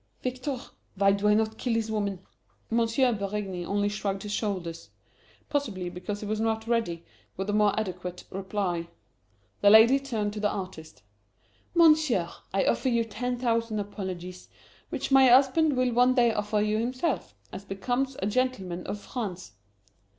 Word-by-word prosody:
"Victor, 255 Hz, +2 st, -3 dB, 0.4 s
why 195 Hz, 0 st, +4 dB
do 200 Hz, +1 st, +1 dB
I 210 Hz, -, +5 dB
not 220 Hz, 0 st, 0 dB
kill 240 Hz, -3 st, 0 dB
this 225 Hz, -1 st, -1 dB
woman?" 200 Hz, -3 st, -2 dB, 0.5 s
M. 230 Hz, -, +3 dB, 0.4 s
Berigny 200 Hz, -2 st, -3 dB
only 205 Hz, +3 st, 0 dB
shrugged 200 Hz, -2 st, -3 dB
his 210 Hz, -, -5 dB
shoulders. 185 Hz, -6 st, -3 dB, 0.6 s
Possibly 200 Hz, -12 st, -2 dB
because 180 Hz, +3 st, -5 dB
he -, -, -5 dB
was 215 Hz, +1 st, -2 dB
not 220 Hz, 0 st, 0 dB
ready 225 Hz, -8 st, -1 dB, 0.3 s
with 195 Hz, +2 st, -2 dB
a -, -, -3 dB
more 210 Hz, 0 st, +3 dB
adequate 180 Hz, -3 st, -5 dB
reply. 190 Hz, -3 st, -2 dB, 0.7 s
The 200 Hz, -, +6 dB
lady 225 Hz, +6 st, +7 dB
turned 220 Hz, -7 st, -2 dB
to 210 Hz, -, -5 dB
the 210 Hz, 0 st, +1 dB
artist. 185 Hz, -, -7 dB, 0.7 s
"Monsieur, 305 Hz, -, +4 dB, 0.2 s
I 195 Hz, -, +1 dB
offer 260 Hz, -, +1 dB
you 235 Hz, -1 st, +2 dB
ten 245 Hz, +3 st, -3 dB
thousand 230 Hz, -2 st, 0 dB
apologies, 185 Hz, -3 st, -6 dB, 0.4 s
which -, -, -4 dB
my 270 Hz, -1 st, +7 dB
husband 270 Hz, +3 st, +5 dB
will 255 Hz, -1 st, +2 dB
one 250 Hz, +2 st, +4 dB
day 240 Hz, -3 st, +4 dB
offer 210 Hz, 0 st, 0 dB
you 215 Hz, +1 st, +1 dB
himself, 255 Hz, -, -2 dB, 0.2 s
as 190 Hz, -, -7 dB
becomes 245 Hz, +7 st, -2 dB
a -, -, +2 dB
gentleman 200 Hz, -6 st, -1 dB
of 210 Hz, -, -4 dB
France." 195 Hz, -, -5 dB
210 Hz, 160 wpm, -27 LUFS, 195-245 Hz, 0.7 s, lady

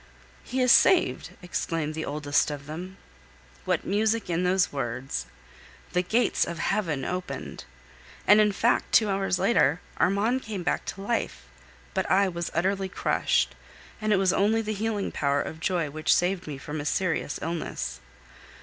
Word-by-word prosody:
"He 260 Hz, +1 st, -2 dB
is 250 Hz, -1 st, +5 dB
saved!" 370 Hz, -, +4 dB
exclaimed 165 Hz, -3 st, -2 dB
the 160 Hz, 0 st, -4 dB
oldest 145 Hz, 0 st, +1 dB
of 145 Hz, -1 st, -6 dB
them. 180 Hz, +6 st, -7 dB, 0.7 s
What -, -, 0 dB
music 215 Hz, 0 st, 0 dB
in 170 Hz, +2 st, 0 dB
those 180 Hz, -2 st, +2 dB
words! 120 Hz, -, -3 dB, 0.7 s
The 180 Hz, -, +3 dB
gates 225 Hz, +7 st, +2 dB
of 170 Hz, -, -4 dB
heaven 165 Hz, -7 st, -1 dB
opened! 180 Hz, 0 st, -5 dB, 0.6 s
And, 210 Hz, +1 st, +7 dB
in 210 Hz, -1 st, +3 dB
fact, 230 Hz, +4 st, +1 dB
two 215 Hz, -2 st, +5 dB
hours 195 Hz, -1 st, 0 dB
later 180 Hz, -, +3 dB, 0.2 s
Armand 215 Hz, +7 st, +2 dB
came 210 Hz, -6 st, -5 dB
back 175 Hz, -, -1 dB
to 195 Hz, -, -6 dB
life; 225 Hz, -, -2 dB, 0.5 s
but -, -, -1 dB
I 195 Hz, +1 st, +4 dB
was 170 Hz, -1 st, -4 dB
utterly 190 Hz, +3 st, 0 dB
crushed, -, -, +1 dB, 0.5 s
and 215 Hz, 0 st, 0 dB
it -, -, +5 dB
was 190 Hz, -1 st, +3 dB
only 220 Hz, +3 st, +2 dB
the 215 Hz, 0 st, -2 dB
healing 210 Hz, -1 st, -2 dB
power 140 Hz, -1 st, +1 dB
of 160 Hz, -, -4 dB
joy 165 Hz, -3 st, -1 dB
which 155 Hz, +1 st, 0 dB
saved 180 Hz, 0 st, 0 dB
me 145 Hz, -2 st, -5 dB
from 150 Hz, +2 st, -5 dB
a -, -, -7 dB
serious 160 Hz, -3 st, -1 dB
illness. 160 Hz, -, -4 dB
180 Hz, 160 wpm, -27 LUFS, 155-205 Hz, 0.7 s, And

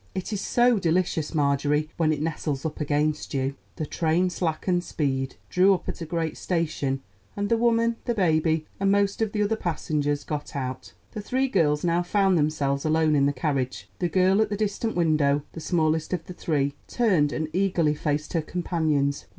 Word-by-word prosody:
It 190 Hz, +3 st, -3 dB
is 205 Hz, -, -2 dB
so 240 Hz, 0 st, +3 dB
delicious, 170 Hz, -2 st, 0 dB
Marjorie, 145 Hz, +1 st, +1 dB
when 160 Hz, -2 st, +2 dB
it 150 Hz, -1 st, -1 dB
nestles 150 Hz, -3 st, -3 dB
up 155 Hz, 0 st, -4 dB
against 150 Hz, 0 st, 0 dB
you." 135 Hz, 0 st, 0 dB, 0.2 s
The 155 Hz, -, -3 dB
train 170 Hz, +4 st, +1 dB
slackened 175 Hz, +1 st, -1 dB
speed, 135 Hz, -5 st, -2 dB
drew 190 Hz, +2 st, +4 dB
up -, -, -8 dB
at -, -, -5 dB
a 165 Hz, -, -4 dB
great 165 Hz, -1 st, -2 dB
station, 150 Hz, -6 st, -1 dB, 0.3 s
and 205 Hz, 0 st, -1 dB
the 230 Hz, -, +3 dB
woman, 230 Hz, 0 st, +2 dB
the 240 Hz, -, 0 dB
baby, 160 Hz, -4 st, +2 dB
and 195 Hz, 0 st, +2 dB
most 200 Hz, +1 st, +1 dB
of 220 Hz, -2 st, +1 dB
the 210 Hz, -1 st, 0 dB
other 215 Hz, +2 st, +1 dB
passengers 150 Hz, -6 st, -1 dB
got 150 Hz, -1 st, -5 dB
out. 130 Hz, -1 st, -5 dB, 0.2 s
The 215 Hz, -, -5 dB
three 260 Hz, +6 st, 0 dB
girls 150 Hz, -, +2 dB
now 170 Hz, 0 st, +2 dB
found 190 Hz, +1 st, +2 dB
themselves 145 Hz, -3 st, 0 dB
alone 155 Hz, -1 st, +2 dB
in 140 Hz, -1 st, +4 dB
the -, -, +2 dB
carriage. 135 Hz, -2 st, -2 dB
The 175 Hz, -, 0 dB
girl 190 Hz, +3 st, +3 dB
at 215 Hz, -, +1 dB
the 205 Hz, -, -2 dB
distant 215 Hz, +2 st, -1 dB
window, 150 Hz, -4 st, +2 dB
the -, -, -7 dB
smallest 160 Hz, 0 st, 0 dB
of 170 Hz, -3 st, -2 dB
the 180 Hz, -, -8 dB
three, 145 Hz, -5 st, -1 dB
turned 185 Hz, -12 st, +2 dB
and 155 Hz, 0 st, -2 dB
eagerly 180 Hz, -5 st, +2 dB
faced 150 Hz, 0 st, -2 dB
her 165 Hz, -, +1 dB
companions. 155 Hz, -4 st, -1 dB
160 Hz, 190 wpm, -25 LUFS, 150-190 Hz, 0.3 s, drew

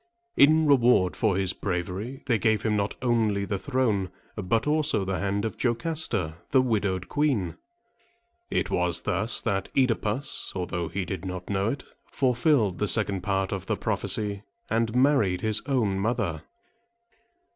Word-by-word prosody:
In 155 Hz, +2 st, +5 dB
reward 125 Hz, -10 st, +4 dB
for 105 Hz, -5 st, +1 dB
his 95 Hz, -1 st, +1 dB
bravery, 95 Hz, +7 st, -4 dB
they 115 Hz, -4 st, +1 dB
gave 110 Hz, -1 st, +1 dB
him 110 Hz, -1 st, +1 dB
not 100 Hz, 0 st, -1 dB
only 110 Hz, -5 st, +1 dB
the 100 Hz, -1 st, -3 dB
throne, 115 Hz, -9 st, 0 dB, 0.3 s
but 110 Hz, +2 st, 0 dB
also 150 Hz, -8 st, +1 dB
the 95 Hz, 0 st, -2 dB
hand 100 Hz, +2 st, -1 dB
of 110 Hz, -, -5 dB
Jocasta, 115 Hz, -, 0 dB
the 135 Hz, -, +4 dB
widowed 100 Hz, -6 st, -1 dB
queen. 125 Hz, -, 0 dB, 0.9 s
It -, -, -1 dB
was 90 Hz, -1 st, +1 dB
thus 105 Hz, +4 st, 0 dB
that 95 Hz, -1 st, -2 dB
OEdipus, 125 Hz, 0 st, 0 dB
although 90 Hz, -2 st, -3 dB
he 95 Hz, +4 st, -3 dB
did 95 Hz, -3 st, -5 dB
not 90 Hz, 0 st, -6 dB
know 100 Hz, +2 st, +1 dB
it, 135 Hz, +2 st, -4 dB, 0.2 s
fulfilled 125 Hz, -, +1 dB
the 105 Hz, -, +1 dB
second 100 Hz, -4 st, +3 dB
part 95 Hz, 0 st, -1 dB
of 95 Hz, -2 st, -4 dB
the -, -, -1 dB
prophecy, 100 Hz, -2 st, -1 dB, 0.3 s
and 115 Hz, 0 st, 0 dB
married 125 Hz, -9 st, +3 dB
his 110 Hz, -1 st, +2 dB
own 110 Hz, -8 st, +1 dB
mother. 100 Hz, -7 st, -2 dB
105 Hz, 150 wpm, -26 LUFS, 95-125 Hz, 0.9 s, In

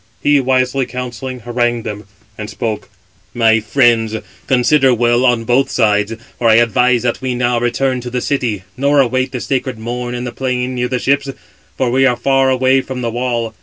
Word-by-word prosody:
He 145 Hz, -1 st, +4 dB
wisely 130 Hz, 0 st, +1 dB
counselling, 125 Hz, +1 st, -6 dB
harangued 120 Hz, 0 st, -1 dB
them, 105 Hz, -1 st, -6 dB, 0.3 s
and 105 Hz, -1 st, -7 dB
spoke: 110 Hz, -1 st, -4 dB, 0.5 s
"My 115 Hz, -1 st, +4 dB
friends, 115 Hz, -1 st, +2 dB, 0.3 s
consider 130 Hz, 0 st, +3 dB
well 120 Hz, +1 st, +2 dB
on 120 Hz, -2 st, +2 dB
both 130 Hz, +4 st, +1 dB
sides; 105 Hz, -2 st, +1 dB, 0.3 s
for 115 Hz, -, +3 dB
I 110 Hz, -, +6 dB
advise 120 Hz, +1 st, +3 dB
that 120 Hz, +1 st, -1 dB
we 130 Hz, -1 st, -2 dB
now 120 Hz, -1 st, +1 dB
return 125 Hz, +2 st, -1 dB
to 125 Hz, -, -6 dB
the 125 Hz, +1 st, -2 dB
city, 120 Hz, -8 st, -2 dB
nor 140 Hz, +2 st, +2 dB
await 130 Hz, 0 st, +1 dB
the 125 Hz, -, -4 dB
sacred 130 Hz, -1 st, -2 dB
Morn 120 Hz, +2 st, -4 dB
in 120 Hz, -, -4 dB
the 120 Hz, -, -4 dB
plain 125 Hz, -1 st, -2 dB
near 125 Hz, 0 st, -1 dB
the 125 Hz, -, -1 dB
ships; 140 Hz, +2 st, 0 dB, 0.5 s
for 130 Hz, -2 st, 0 dB
we 135 Hz, +1 st, +3 dB
are 125 Hz, -, +2 dB
far 135 Hz, -1 st, +2 dB
away 130 Hz, +1 st, +3 dB
from 130 Hz, -1 st, -6 dB
the 115 Hz, -, -1 dB
wall. 120 Hz, -1 st, -2 dB
125 Hz, 190 wpm, -16 LUFS, 120-130 Hz, 0.5 s, I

